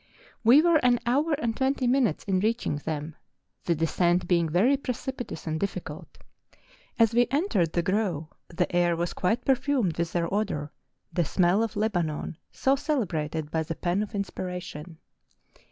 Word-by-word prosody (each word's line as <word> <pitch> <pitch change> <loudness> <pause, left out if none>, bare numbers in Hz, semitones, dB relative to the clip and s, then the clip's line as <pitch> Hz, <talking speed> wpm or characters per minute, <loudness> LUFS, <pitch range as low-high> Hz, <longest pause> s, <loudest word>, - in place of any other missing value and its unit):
We 255 +7 +7
were 340 -2 +5
an 245 -4 +3
hour 285 +7 +2
and 235 -6 -1
twenty 265 0 0
minutes 245 - +2
in 190 -2 0
reaching 220 -6 0
them, 150 +1 -5 0.5
the 170 - +2
descent 175 +3 +1
being 170 -3 +2
very 205 - +3
precipitous 255 - -5
and 160 -1 -2
difficult. 175 -5 -5 0.8
As 230 -1 +4
we 240 +1 +4
entered 255 - +1
the 170 - +1
grove, 185 -5 0 0.2
the 175 +1 -2
air 175 -1 +3
was 170 +1 -2
quite 220 +7 0
perfumed 260 - +1
with 170 -1 -1
their 170 +1 -1
odour, 195 -8 -1 0.2
'' - - -41
the 175 - +2
smell 175 +5 +2
of 225 -1 -2
Lebanon 175 -8 -1
" - - -51
so 270 +1 +2
celebrated 165 - -2
by 160 - 0
the 160 +1 -4
pen 175 +4 0
of 210 +1 -5
inspiration. 180 -4 -5
185 Hz, 165 wpm, -27 LUFS, 165-245 Hz, 0.8 s, We